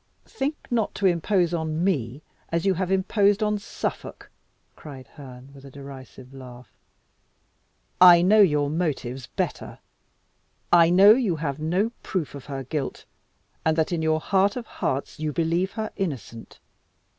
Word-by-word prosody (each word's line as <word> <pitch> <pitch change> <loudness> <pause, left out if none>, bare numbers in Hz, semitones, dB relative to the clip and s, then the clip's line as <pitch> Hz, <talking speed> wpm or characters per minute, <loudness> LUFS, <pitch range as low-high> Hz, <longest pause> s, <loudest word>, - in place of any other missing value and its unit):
"Think 300 - -3
not 230 -3 -1
to 200 - -2
impose 175 0 +1
on 160 0 -2
me 140 -7 -2 0.3
as 170 +1 -2
you 195 - +3
have 185 +1 -3
imposed 200 +2 +2
on 210 -1 0
Suffolk!" 200 - -6 0.4
cried 135 -4 -11
Herne, 130 -2 -13
with 135 -1 -15
a 140 - -11
derisive 135 -1 -12
laugh. 125 -2 -12 1.3
"I 175 -1 +9
know 210 +4 +5
your 150 -7 +3
motives 135 -7 -3
better; - - -4 1.0
I 170 -1 +6
know 195 +4 +7
you 220 -7 +2
have 150 -2 -4
no 180 +8 0
proof 175 -6 -4
of 140 -2 -10
her 135 -2 -6
guilt, 135 +1 -5 0.6
and 160 0 +1
that 160 +1 0
in 170 -2 -1
your 160 0 +1
heart 195 +4 +1
of 245 -2 -5
hearts 135 -2 -4
you 155 -1 -2
believe 170 +5 -1
her 220 -1 -4
innocent. 130 - -6
165 Hz, 150 wpm, -24 LUFS, 140-195 Hz, 1.3 s, I